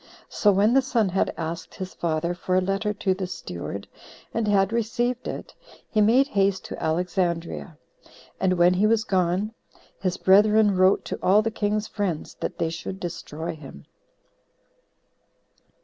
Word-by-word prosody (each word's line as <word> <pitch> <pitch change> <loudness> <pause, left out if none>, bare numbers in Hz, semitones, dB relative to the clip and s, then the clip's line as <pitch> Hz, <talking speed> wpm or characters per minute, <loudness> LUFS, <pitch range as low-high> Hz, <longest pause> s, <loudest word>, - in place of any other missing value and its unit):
So 205 - +3
when 205 +4 +3
the 270 - +5
son 235 -6 +1
had 190 +1 +1
asked 165 +1 -5
his 185 -1 -6
father 170 +1 -1
for 185 +1 -2
a - - +5
letter 195 +3 -1
to 200 -2 0
the 185 0 -4
steward, 100 - -6 0.5
and 225 -1 -1
had 200 0 +2
received 240 +2 -1
it, - - -6 0.4
he 215 - +3
made 250 +7 +4
haste 195 -5 +1
to - - -7
Alexandria. 170 0 -1 0.6
And 190 -1 +2
when 175 0 +4
he 195 +4 +3
was 220 0 +2
gone, 190 0 0 0.5
his 185 -1 -1
brethren 210 +1 +5
wrote 185 +1 +3
to - - -4
all 205 +3 +4
the 225 - -1
king's 210 0 -1
friends, 195 -8 -3
that - - -4
they 165 - -1
should 185 +3 -6
destroy 165 -2 -5
him. 135 - -12
190 Hz, 155 wpm, -25 LUFS, 175-215 Hz, 0.6 s, the